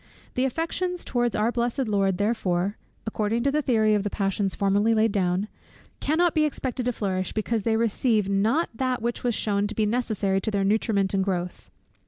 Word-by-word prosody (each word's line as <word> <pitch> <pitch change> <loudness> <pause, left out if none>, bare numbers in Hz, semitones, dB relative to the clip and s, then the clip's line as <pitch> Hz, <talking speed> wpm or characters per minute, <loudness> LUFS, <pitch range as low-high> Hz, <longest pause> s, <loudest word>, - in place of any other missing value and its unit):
The 255 - +1
affections 335 +6 -2
towards 240 -2 0
our 220 +2 +1
blessed 240 +2 -1
Lord 195 -3 +1
therefore 200 -2 0 0.3
(according 220 +1 -1
to 280 - +2
the 300 +2 +1
theory 220 -6 +2
of 210 - +2
the 205 - -2
passions 195 -1 -1
formerly 205 +3 +2
laid 220 0 +3
down) 185 0 0 0.5
cannot 330 +3 +2
be 310 - +3
expected 260 -4 -2
to - - +2
flourish, 190 -5 -2
because 220 +1 -1
they 220 +2 +1
receive 225 -2 +1
not 215 +12 +1
that 255 0 -1
which 235 0 -2
was 240 -3 +1
shewn 205 -1 0
to 215 - -6
be 215 - +1
necessary 210 -4 0
to 220 - -1
their 200 -2 0
nutriment 200 -1 +1
and 195 -1 +2
growth. 180 -2 -3
220 Hz, 190 wpm, -25 LUFS, 200-240 Hz, 0.5 s, laid